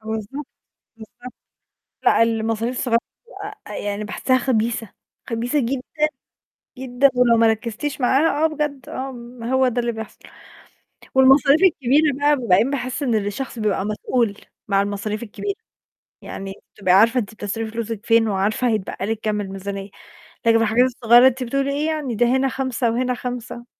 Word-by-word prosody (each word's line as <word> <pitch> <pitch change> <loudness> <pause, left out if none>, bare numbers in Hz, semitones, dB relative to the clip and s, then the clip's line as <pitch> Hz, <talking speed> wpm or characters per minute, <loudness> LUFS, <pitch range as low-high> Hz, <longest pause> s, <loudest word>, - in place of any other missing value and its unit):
بالضبط، 220 +6 -5 0.5
بالضبط، 245 +3 -12 0.7
لأ 230 - +5
المصاريف 225 +2 -1
الصغيرة 235 -3 +2 0.7
آآ، 210 - -8
يعني 205 +1 -3
باحسها 255 +5 0
خبيثة، 230 -4 -1 0.4
خبيثة 240 +5 0
جدًا، 250 +1 -1 1.0
جدًا، 260 +1 +2
ولو 245 -2 +4
ما 230 0 +4
ركّزتيش 230 +6 -2
معاها 285 +4 +2
آه - - +7
بجد، 295 -3 -3
آه 265 +1 -5
م 240 -1 -10
هو 260 +2 +2
ده 245 0 -1
اللي 235 0 -1
بيحصل، 220 -1 -8 1.0
والمصاريف 270 +3 +6
الكبيرة 295 -3 +3
بقى 290 -3 +2
وبعدين 230 +5 +3
باحس 255 0 -3
إن 250 -5 +1
الشخص 215 +5 -3
بيبقى 205 -3 0
مسؤول 215 0 -1 0.3
مع 195 -1 +3
المصاريف 205 +2 -3
الكبيرة، 315 - -4 0.7
يعني 195 0 -7 0.2
تبقي 185 -2 +2
عارفة 225 +5 +5
إن - - +4
أنتِ 210 0 -7
بتصرفي 220 +2 -4
فلوسِك 225 -1 -5
فين، 225 -1 +4
وعارفة 205 +5 0
هيتبقى 210 -3 -2
لِك 220 0 -2
كام 210 -1 -1
الميزانية، 195 0 -6 0.6
لكن 230 - +5
الحاجات 225 +2 +3
الصغيرة 240 0 +5
أنتِ 260 0 0
بتقولي 275 +3 -1
إيه 300 +2 -1
يعني، 300 -7 -2
ده 240 - +3
هنا 260 +2 +2
5 255 -2 -1
وهنا 250 +2 0
5 245 -1 -6
235 Hz, 155 wpm, -21 LUFS, 220-260 Hz, 1.0 s, آه